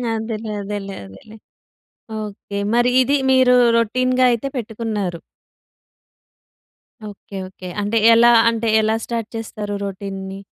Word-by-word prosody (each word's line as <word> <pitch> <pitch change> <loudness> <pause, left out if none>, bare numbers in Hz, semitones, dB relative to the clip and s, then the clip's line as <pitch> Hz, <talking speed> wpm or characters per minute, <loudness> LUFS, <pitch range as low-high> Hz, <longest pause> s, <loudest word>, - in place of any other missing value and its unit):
అదేలే, 220 0 -4
అదేలే, 200 -1 -5
అదేలే. 95 - -14 0.8
ఓకె. 205 -1 -6
మరి 240 +1 +3
ఇది 270 +3 +2 0.2
మీరు 255 -1 +5 0.2
రొటీన్‌గా 255 +3 +1
అయితే 235 +3 -1
పెట్టుకున్నారు. 215 -6 -4 1.9
Okay, 200 -1 -11
okay. 185 -1 -10
అంటే 205 +3 -1 0.2
ఎలా, 235 +1 +6 0.2
అంటే 230 0 -2
ఎలా 215 - 0 0.2
స్టార్ట్ 230 -2 -4
చేస్తారు 215 -2 -5
రొటీన్‌‌‌‌‌‌‌‌‌‌‌‌‌‌‌‌‌‌‌‌‌‌‌‌‌‌‌ని. 195 0 -7
215 Hz, 110 wpm, -20 LUFS, 200-235 Hz, 1.9 s, ఎలా